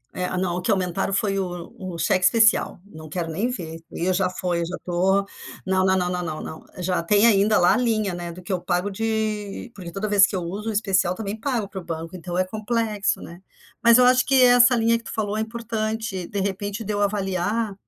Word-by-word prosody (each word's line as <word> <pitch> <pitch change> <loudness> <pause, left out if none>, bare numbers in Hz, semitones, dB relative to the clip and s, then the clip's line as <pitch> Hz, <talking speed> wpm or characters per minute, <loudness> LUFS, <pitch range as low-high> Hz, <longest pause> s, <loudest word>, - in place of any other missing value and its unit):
É 180 0 -2
não, 180 -1 -1
o - - -3
que 175 - -4
aumentaram 185 0 0
foi 195 0 0
o 175 -1 -5
o 185 -6 -7
cheque 185 +3 +1
especial, 225 0 +4
não 155 -5 -12
quero 165 0 -3
nem 215 +10 -1
ver, 165 -9 -6
e 170 - -3
eu 185 - +2
já 185 0 +1
foi, 180 -1 -2
já 180 +2 -4
estou, 190 +3 +1 0.4
não, 190 0 +2
não, 190 0 +3
não, 180 -3 -2
não. 160 - -8
Já 180 0 -1
tem 205 +6 +3
ainda 210 -1 +4
lá 175 - +5
a - - +2
linha, 215 -6 0
né, 175 -1 -5
do 180 +2 -11
que 185 - -3
eu 180 - -1
pago 180 +4 -1
de 220 +1 -3
porque 180 -4 -8
toda 195 +4 -3
vez 205 -1 +5
que 200 - -5
eu 180 - -1
uso 200 +6 -4
o - - -1
especial, 190 -4 +1
também 210 +1 -5
pago 230 -4 -1
para 190 -1 -7
o - - -14
banco, 165 +1 -6
então 175 0 -5
é 185 - +2
complexo, 215 0 -1
né. 175 +2 -11 0.4
Mas 235 0 +7
eu 250 - +6
acho 255 0 +5
que 270 -1 +3
essa 245 0 +6
linha 230 0 +2
que - - -18
tu - - -7
falou 210 -1 -2
é 220 - 0
importante, 220 -4 -3
de 205 - -4
repente, 200 +2 -3
de 210 0 -3
eu 205 - -1
avaliar, 200 +1 -1
195 Hz, 230 wpm, -23 LUFS, 180-220 Hz, 0.4 s, Mas